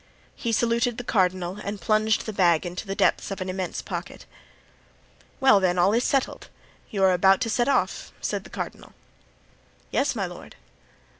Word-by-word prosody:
He 235 - -3
saluted 235 +1 +1
the 245 - -5
cardinal 185 -3 0
and 200 0 -4
plunged 215 +4 +1
the 215 - -4
bag 175 -3 +3
into 180 +4 -6
the 195 - -3
depths - - +1
of 195 - -5
an 185 0 -4
immense 185 -1 -4
pocket. - - -6 1.1
"Well, 265 -7 +6
then, 180 -2 +1
all 185 +4 +4
is 235 +2 +2
settled; 270 -1 -1 0.4
you 200 -4 -1
are 185 -1 +5
to 195 +6 +3
set 240 +3 +1
off," 280 - 0
said - - -3
the - - -13
cardinal. - - -7 1.0
"Yes, 275 -2 +1
my 200 -4 -1
lord." 175 -1 -10
195 Hz, 165 wpm, -25 LUFS, 185-230 Hz, 1.1 s, Well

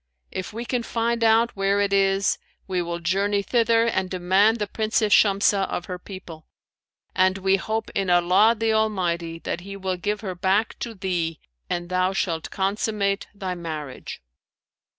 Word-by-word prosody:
If 185 - -5
we 230 +3 -5
can 245 0 -1
find 230 0 -1
out 225 +1 +4
where 195 0 +1
it 200 -1 +1
is, 195 0 +2 0.3
we 185 -2 0
will 170 0 -3
journey 200 +4 0
thither 230 +1 +3
and 190 -5 0
demand 190 +5 +3
the 210 - -1
Princess 215 0 0
Shamsah 200 -1 +4
of 175 - -3
her 180 -1 -6
people, 180 -4 -10 0.7
and 185 +1 +3
we 195 0 +2
hope 220 +3 -3
in 195 -2 -1
Allah 180 +6 +5
the 225 0 +1
Almighty 175 -6 0
that 175 - -3
He 195 +2 -8
will 190 -1 -2
give 205 +3 -2
her 190 -4 -4
back 190 +4 0
to 230 -2 -5
thee 175 -5 -2 0.3
and 175 0 -2
thou 185 +1 +1
shalt 165 -4 -2
consummate 200 0 -1
thy 190 -2 -3
marriage.' 155 - -7
195 Hz, 165 wpm, -24 LUFS, 180-215 Hz, 0.7 s, Allah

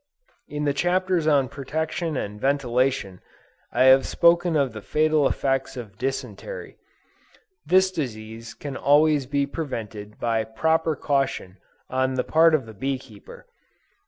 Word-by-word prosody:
In 150 0 -4
the 145 - +2
Chapters 175 +1 +1
on 140 -4 +3
Protection 155 +4 -3
and 105 -2 -5
Ventilation, 130 -7 0 0.5
I - - +2
have 130 +1 +6
spoken 170 0 +3
of 140 -5 +1
the 110 - -7
fatal 155 +2 +2
effects 135 -1 -1
of 105 -5 -9
dysentery. 135 - -5 0.9
This 190 0 +4
disease 115 -7 -6
can 140 -2 -7
always 145 -1 +3
be 140 0 0
prevented 110 -9 -6
by 115 -2 0
proper 160 +8 0
caution 135 -10 -1 0.3
on 130 0 0
the 125 - 0
part 160 0 +4
of 135 -6 -2
the 110 - -11
bee 135 +5 -2
keeper. 110 -6 -14
135 Hz, 135 wpm, -24 LUFS, 120-155 Hz, 0.9 s, have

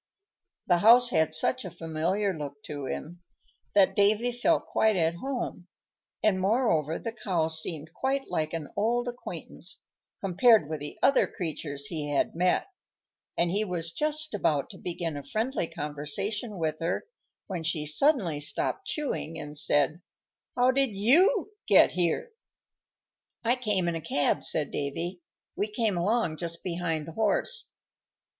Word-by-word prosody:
The 175 -2 +3
house 240 +4 +7
had 160 -3 +2
such 255 +11 0
a 185 - -5
familiar 170 +5 -1
look 145 -2 -7
to 145 -2 -6
him 175 +6 -6 0.5
that 195 -2 +5
Davy 215 +4 +3
felt 245 +7 +1
quite 220 -1 +2
at 165 -2 +2
home; 245 -7 -4 0.6
and, 190 -3 +2
moreover, 190 - +1
the 230 - -5
Cow 180 -8 -1
seemed 160 -1 -1
quite 270 +1 -1
like 155 -1 -1
an 165 -3 -5
old 240 +4 +1
acquaintance, 245 0 -4 0.4
compared 195 - +4
with 155 0 -4
the 145 +1 -7
other 275 - +4
creatures 150 -6 -4
he 150 -1 -3
had 145 - 0
met, 180 +2 +1 0.7
and 170 0 +2
he 205 +3 +1
was 170 -4 -3
just 305 - -1
about 150 -8 0
to - - -13
begin 170 -3 -4
a 145 - -6
friendly 220 - -2
conversation 195 - -3
with 155 -2 -2
her, 170 - -2 0.4
when 185 -4 -4
she 160 -2 -1
suddenly 175 - +2
stopped 150 - 0
chewing, 275 - -3
and 150 -1 -7
said, 145 +3 +3 0.5
"How 250 +1 +4
did 265 -5 +1
you 355 - +3 0.2
get - - +6
here?" 180 - -1 1.1
"I 240 +2 +3
came 210 -8 0
in 170 - 0
a 165 - -4
cab," 145 -1 0
said 150 -3 +2
Davy. 170 +6 -4 0.3
"We 205 - -1
came 220 -2 +1
along 175 -2 0
just 170 0 -4
behind 170 -3 -2
the - - -6
horse." 225 - +2
180 Hz, 150 wpm, -28 LUFS, 160-230 Hz, 1.1 s, house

